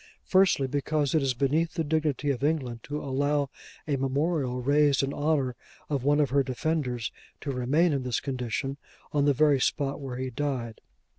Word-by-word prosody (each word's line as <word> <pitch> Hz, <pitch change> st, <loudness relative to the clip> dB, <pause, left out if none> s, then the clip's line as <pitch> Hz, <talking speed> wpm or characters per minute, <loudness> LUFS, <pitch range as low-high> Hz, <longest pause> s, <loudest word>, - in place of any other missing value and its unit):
Firstly, 185 Hz, -7 st, +4 dB
because 145 Hz, +1 st, 0 dB
it 160 Hz, -, +3 dB
is 135 Hz, -2 st, 0 dB
beneath 150 Hz, +6 st, +1 dB
the 165 Hz, -, 0 dB
dignity 150 Hz, -2 st, 0 dB
of 135 Hz, 0 st, -4 dB
England 140 Hz, -6 st, 0 dB
to 150 Hz, +5 st, -4 dB
allow 140 Hz, +1 st, 0 dB, 0.4 s
a 145 Hz, -2 st, +1 dB
memorial 135 Hz, -1 st, 0 dB
raised 140 Hz, +2 st, +3 dB
in 135 Hz, +1 st, -1 dB
honour 145 Hz, -4 st, 0 dB, 0.4 s
of 140 Hz, -4 st, 0 dB
one 145 Hz, +2 st, +3 dB
of 145 Hz, -4 st, +2 dB
her 140 Hz, +1 st, +4 dB
defenders, 130 Hz, -3 st, -2 dB, 0.3 s
to 140 Hz, -, -3 dB
remain 145 Hz, +7 st, +2 dB
in 140 Hz, -, 0 dB
this 125 Hz, -2 st, -1 dB
condition, 135 Hz, +1 st, -3 dB, 0.4 s
on 145 Hz, -1 st, +3 dB
the 145 Hz, -, +4 dB
very 145 Hz, 0 st, +4 dB
spot 140 Hz, +1 st, 0 dB
where 130 Hz, -3 st, -5 dB
he 130 Hz, 0 st, -3 dB
died. 125 Hz, -4 st, -3 dB
140 Hz, 175 wpm, -28 LUFS, 130-150 Hz, 0.4 s, Firstly